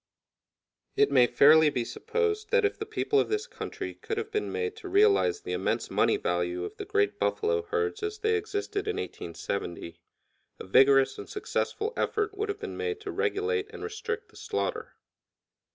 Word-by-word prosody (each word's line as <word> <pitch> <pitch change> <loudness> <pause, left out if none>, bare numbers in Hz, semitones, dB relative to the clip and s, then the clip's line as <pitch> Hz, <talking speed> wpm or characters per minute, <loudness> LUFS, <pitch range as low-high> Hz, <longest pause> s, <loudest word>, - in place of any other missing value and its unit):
It 420 0 +3
may 120 - +6
fairly 150 +5 +6
be 125 -4 -2
supposed 430 - -2
that 475 -2 +3
if 415 - +1
the 430 - -4
people 430 -1 +1
of - - +1
this 425 +1 -1
country - - -6
could 450 -1 -5
have 440 -1 -3
been 425 0 -1
made 445 -2 -2
to 400 -4 -8
realize 420 +2 +4
the - - -6
immense - - -1
money 415 - +3
value 360 -1 -1
of 420 0 -7
the 410 - -5
great 415 +1 +1
buffalo 445 +1 +1
herds 440 -1 -2
as 425 0 -3
they 435 +1 +1
existed 415 -1 -2
in 435 - 0
1870, 85 - -5 0.6
a - - -8
vigorous 135 +6 +5
and - - -8
successful 430 +1 -2
effort 425 -2 -1
would 420 +1 -2
have 410 0 -3
been 435 - -6
made 440 -1 -2
to 410 -2 -5
regulate 425 0 -1
and 445 -2 -9
restrict 445 +1 -4
the - - -17
slaughter. - - -3
425 Hz, 180 wpm, -28 LUFS, 400-440 Hz, 0.6 s, may